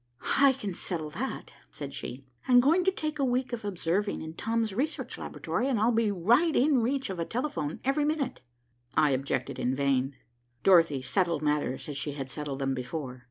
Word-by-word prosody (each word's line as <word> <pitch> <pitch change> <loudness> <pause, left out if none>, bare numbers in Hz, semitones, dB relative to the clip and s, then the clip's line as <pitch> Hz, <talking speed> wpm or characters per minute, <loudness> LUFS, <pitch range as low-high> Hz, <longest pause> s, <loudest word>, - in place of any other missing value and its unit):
"I 275 -1 +7
can 210 -7 -5
settle 160 -3 -4
that," - - -5 0.2
said - - -7
she. 130 +2 -7 0.2
"I 255 - +3
am 245 - +9
going 320 +8 +4
to 385 - +5
take 305 -4 -4
a - - +2
week 255 0 0
of 230 - -3
observing 200 0 -1
in 160 0 -7
Tom's 225 +2 -1
research 280 +9 -2
laboratory, 255 - -2
and 255 -6 +1
I'll 225 +3 +4
be 225 -2 +2
right 235 - +3
in 270 -1 +4
reach 260 -1 0
of 185 - -5
a - - +1
telephone 235 - -3
every 275 +3 +2
minute." 295 -2 -1 0.6
I 150 - +5
objected 130 -1 -1
in 130 +2 0
vain. 135 -1 +1 0.5
Dorothy 165 -8 +5
settled 170 +2 0
matters 150 -3 0
as 145 -2 -4
she 140 +1 -3
had 135 -2 -6
settled 145 -3 -4
them 135 -1 0
before. 130 0 -5
190 Hz, 195 wpm, -29 LUFS, -, 0.6 s, am